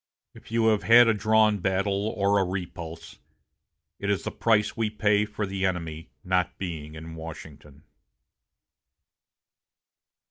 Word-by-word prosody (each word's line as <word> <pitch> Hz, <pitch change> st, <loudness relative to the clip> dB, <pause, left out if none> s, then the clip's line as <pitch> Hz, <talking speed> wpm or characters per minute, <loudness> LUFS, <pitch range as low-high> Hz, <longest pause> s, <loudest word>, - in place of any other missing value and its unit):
If -, -, -15 dB
you 115 Hz, -1 st, +3 dB
have 110 Hz, -2 st, +2 dB
had 120 Hz, +1 st, +7 dB
a 115 Hz, -, +4 dB
drawn 110 Hz, 0 st, +3 dB
battle 95 Hz, +2 st, 0 dB
or 100 Hz, 0 st, +3 dB
a -, -, +3 dB
repulse, 85 Hz, -3 st, -6 dB, 0.8 s
it 100 Hz, -, -3 dB
is 100 Hz, -, 0 dB
the -, -, -4 dB
price 105 Hz, -2 st, +1 dB
we 115 Hz, -2 st, 0 dB
pay 105 Hz, -1 st, +2 dB
for 105 Hz, 0 st, -4 dB
the 95 Hz, 0 st, -4 dB
enemy 80 Hz, -5 st, -3 dB
not 90 Hz, -1 st, 0 dB
being 80 Hz, -5 st, -6 dB
in 80 Hz, +1 st, -9 dB
Washington." 75 Hz, -3 st, -11 dB
95 Hz, 135 wpm, -26 LUFS, 85-105 Hz, 0.8 s, had